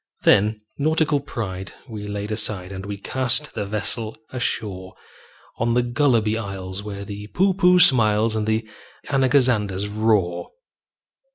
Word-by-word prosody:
Then 105 +2 +4 0.2
nautical 155 0 +2
pride 95 -8 -6
we 105 -4 -7
laid 105 +1 -4
aside, 105 -4 -1
And 95 +1 -7
we 100 0 -4
cast 130 +7 0
the 105 -2 -3
vessel 110 +2 -3
ashore 105 -7 -3 0.6
On 115 +1 +1
the 125 - +3
Gulliby 120 -4 +2
Isles, 95 -2 -6
where 100 -1 -6
the 105 +1 -7
Poohpooh 180 -1 +4
smiles, 110 -8 +5
And 110 -1 -1
the 110 0 0 0.4
Anagazanders 125 -8 +2
roar. 105 -5 0
110 Hz, 125 wpm, -22 LUFS, 100-125 Hz, 0.6 s, smiles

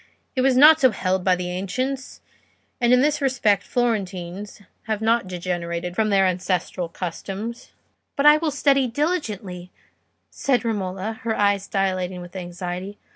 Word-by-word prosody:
It 260 - +1
was 260 -1 +3
not 310 +3 +8
so 260 - +7
held 190 -3 -1
by 185 -1 +4
the 180 0 -4
ancients, 255 +9 -4 0.6
and 240 0 +3
in 250 0 +6
this 300 +1 +1
respect 240 -7 +2
Florentines 200 -5 -3 0.3
have 220 -2 -1
not 225 -1 +1
degenerated 175 -1 -4
from 220 +1 +1
their 195 -1 +4
ancestral 180 -1 -1
customs." 195 +7 -6 0.5
"But 280 - 0
I 300 0 +8
will 320 0 -1
study 275 -2 +2
diligently," 215 - -3 0.6
said 250 -3 0
Romola, 205 0 -3
her 225 -1 -1
eyes 200 -1 +2
dilating 185 -2 -1
with 175 +1 -11
anxiety. 180 +2 -6
200 Hz, 145 wpm, -23 LUFS, 185-250 Hz, 0.6 s, not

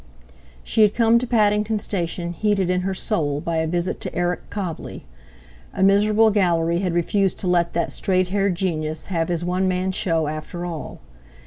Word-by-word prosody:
She 220 - +1
had 210 -1 +4
come 230 0 +4
to 250 - -4
Paddington 215 -1 +2
Station 175 -4 -3
heated 195 -2 +1
in 180 0 +1
her 190 +1 -2
soul 145 -9 0
by 165 +2 -2
a 160 0 0
visit 175 +2 -2
to - - -5
Eric 175 -1 -2
Cobbley. 185 -6 -5 0.7
A - - +1
miserable 210 +3 +4
Gallery 170 -4 +1
had 180 -3 -1
refused 190 +2 +1
to 185 - -4
let 175 -1 +2
that 170 -1 -1
straight 185 -2 0
haired 195 -1 +1
genius 155 -4 -3
have 165 -1 0
his 175 -1 -2
one 185 +1 0
man 185 +1 0
show 165 -4 0
after 155 +3 -5
all. 165 -4 -7
180 Hz, 180 wpm, -22 LUFS, 170-200 Hz, 0.7 s, had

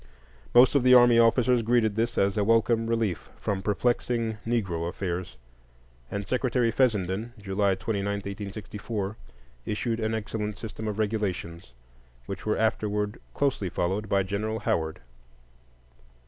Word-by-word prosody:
Most 125 +1 +7
of 140 - +4
the 125 0 +6
army 120 -1 +7
officers 120 +1 +4
greeted 115 -2 +2
this 115 +2 -1
as 100 0 +2
a 105 - +1
welcome 115 +1 +2
relief 115 -7 -1
from 100 -2 -2
perplexing 115 +1 0
"Negro 90 -8 -1
affairs," 90 -7 -4 0.7
and 100 -1 -4
Secretary 125 -1 +1
Fessenden, 110 -2 0
July 100 -1 0
29, 100 +1 -2
1864, 100 +1 -5 0.5
issued 115 +2 -1
an 110 0 -1
excellent 105 -1 -4
system 110 0 -6
of 105 -1 -3
regulations, 95 - -3 0.5
which - - -6
were 105 - +1
afterward 105 -1 0 0.2
closely 135 -9 0
followed 95 +5 -2
by 100 -1 +3
General 105 +3 -2
Howard. 80 -5 -1
105 Hz, 130 wpm, -27 LUFS, 100-115 Hz, 0.7 s, Most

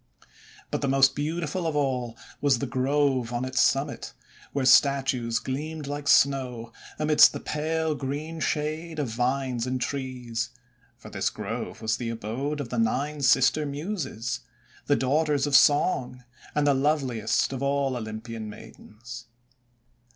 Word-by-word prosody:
But - - -1
the - - 0
most 135 0 +4
beautiful 165 +3 -2
of 155 - -2
all 125 -5 -1 0.2
was 140 -3 +3
the 140 - -2
Grove 130 -1 +1
on 120 +1 -2
its 130 0 +1
summit, 135 +2 0 0.4
where 140 -2 -1
statues 130 -3 +4
gleamed 150 +5 -4
like 145 +1 -5
snow 125 -5 +2 0.2
amidst 150 0 +6
the - - -4
pale 160 +1 -1
green 150 +4 -4
shade 155 +2 -2
of 145 -5 -1
vines 125 +1 -1
and 130 0 -1
trees. 125 -3 -3 0.5
For - - -12
this - - 0
Grove 115 - -6
was 110 +1 +1
the 120 -2 -4
abode 120 +7 -3
of 135 -5 -4
the - - -2
Nine 150 -12 0
Sister 135 +3 +4
Muses, 140 - -4 0.5
the 145 - +4
daughters 145 +2 +1
of 145 -1 +1
song, 125 -3 +3 0.3
and 150 -1 +2
the 145 - +4
loveliest 135 -5 +1
of 135 - -4
all 140 -1 0
Olympian 110 -1 -6
maidens. 120 +3 -11
135 Hz, 145 wpm, -26 LUFS, 125-150 Hz, 0.5 s, amidst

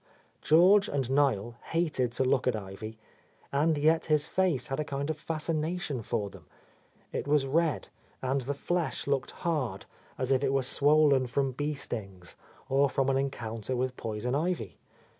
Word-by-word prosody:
George 190 +6 +5
and 135 -3 -1
Niel 120 -5 +1
hated 155 -7 0
to 130 - +1
look 130 0 +2
at 125 - +2
Ivy, 110 +2 -7 0.3
— - - -35
and 150 +3 +2
yet 160 +3 +3
his 150 -2 +2
face 175 -7 0
had 135 - -2
a - - +1
kind 140 +1 -3
of 155 - -5
fascination 155 -3 -2
for 100 -1 -2
them. - - -14 0.7
It - - -3
was 145 -1 +3
red, 160 +3 0 0.3
and 130 +1 0
the 140 +3 -3
flesh 175 +3 -2
looked 140 -2 0 0.2
hard, 150 -8 -1 0.3
as 130 0 -1
if 135 0 +3
it 135 -1 +1
were 135 -1 +2
swollen 145 0 +4
from 135 +2 0
bee 145 +4 -2
stings, 95 -9 -6 0.3
or 135 +1 +3
from 135 +1 +1
an 135 - +2
encounter 120 -3 -3
with 130 +1 -1
poison 115 +2 -3
ivy. 150 - -2
135 Hz, 170 wpm, -29 LUFS, 125-155 Hz, 0.7 s, George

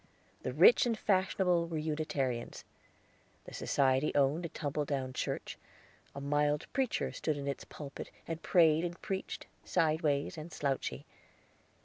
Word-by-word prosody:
The 130 - -3
rich 175 - +6
and 230 -2 0
fashionable 185 -4 +2
were 165 -1 -3
Unitarians. 150 -6 -2 0.8
The - - -10
society 135 +1 +2
owned 145 +5 +2
a - - -16
tumble 150 -1 -2
down 135 -3 -2
church; - - -3 0.6
a - - -4
mild 145 +2 +1
preacher 265 -3 0
stood 155 -2 -2
in 140 0 -5
its 140 - -3
pulpit 140 -2 -8 0.2
and 165 0 -4
prayed 160 -2 +4
and 175 0 -4
preached, 190 -1 -4 0.2
sideways 155 -1 +1
and 160 +2 -8
slouchy. 140 -3 -2
155 Hz, 135 wpm, -33 LUFS, 140-170 Hz, 0.8 s, rich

